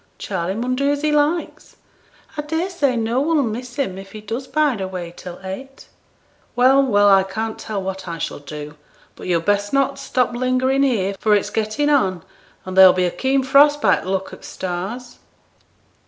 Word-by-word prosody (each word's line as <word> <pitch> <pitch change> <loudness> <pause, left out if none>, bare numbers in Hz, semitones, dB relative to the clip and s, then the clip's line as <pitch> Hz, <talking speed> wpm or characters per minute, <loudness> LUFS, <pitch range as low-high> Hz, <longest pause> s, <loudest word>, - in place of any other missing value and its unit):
Charley 190 - -3
mun 250 +3 -1
do 280 +2 +1
as 290 +1 -1
he 305 - +2
likes; 300 +3 -1 0.6
I 300 - -2
daresay 320 -3 -1
no 230 +3 0
one'll 305 -1 +2
miss 245 +2 -5
him 190 -10 -2
if 195 0 -12
he 215 - -8
does 230 +5 -5
bide 290 -7 +1
away 180 -2 -5
till 180 -1 -9
eight.' 265 +9 -8 0.7
'Well, 260 +3 +5
well! 205 -6 +3
I 195 -1 +6
can't 220 +4 -4
tell 205 -3 -4
what 190 0 -5
I 170 -1 -4
shall 155 - -4
do; 150 +1 -8 0.4
but - - -9
yo'd 170 -2 0
best 205 +1 0
not 275 0 +1
stop 250 -1 0
lingering 255 +2 +1
here, 215 -8 +1
for 215 -1 +3
it's 205 - -1
getting 220 +7 -1
on, 190 - +1 0.4
and 185 0 -6
there'll 190 -1 +9
be 185 0 +1
a 175 - 0
keen 265 +4 0
frost 285 +2 +5
by - - +3
t' - - -8
look 190 0 -2
o' - - -8
the - - -23
stars.' 190 +7 -6
230 Hz, 190 wpm, -20 LUFS, 190-275 Hz, 0.7 s, there'll